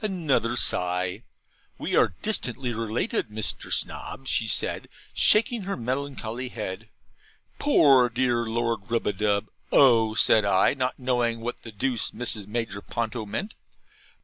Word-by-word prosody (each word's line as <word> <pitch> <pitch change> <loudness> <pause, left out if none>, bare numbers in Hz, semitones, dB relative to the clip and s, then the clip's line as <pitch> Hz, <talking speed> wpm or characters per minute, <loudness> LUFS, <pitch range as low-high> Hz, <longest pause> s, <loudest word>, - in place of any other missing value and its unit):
Another 155 - 0
sigh. 90 -4 0 0.6
'We - - -2
are 90 - +3
distantly 130 - 0
related, 115 - -2
Mr. 105 0 -5
Snob,' 135 - -2
said 110 -4 0
she, - - -22
shaking 230 +2 +4
her 195 +1 -4
melancholy 125 -1 -4
head. 110 -2 -6 0.7
'Poor 135 - +5
dear 120 -1 0
Lord 115 -2 -2
Rubadub!' 105 -2 0 0.2
'Oh!' 115 -5 +5
said 110 0 +5
I; 95 -2 +3
not 130 -2 -2
knowing 120 -3 -1
what 120 +1 -5
the 115 - -10
deuce 115 +3 -1
Mrs. 110 -3 -2
Major 110 -2 -4
Ponto 115 -1 -4
meant. 200 - -4
115 Hz, 125 wpm, -25 LUFS, 110-130 Hz, 0.7 s, Poor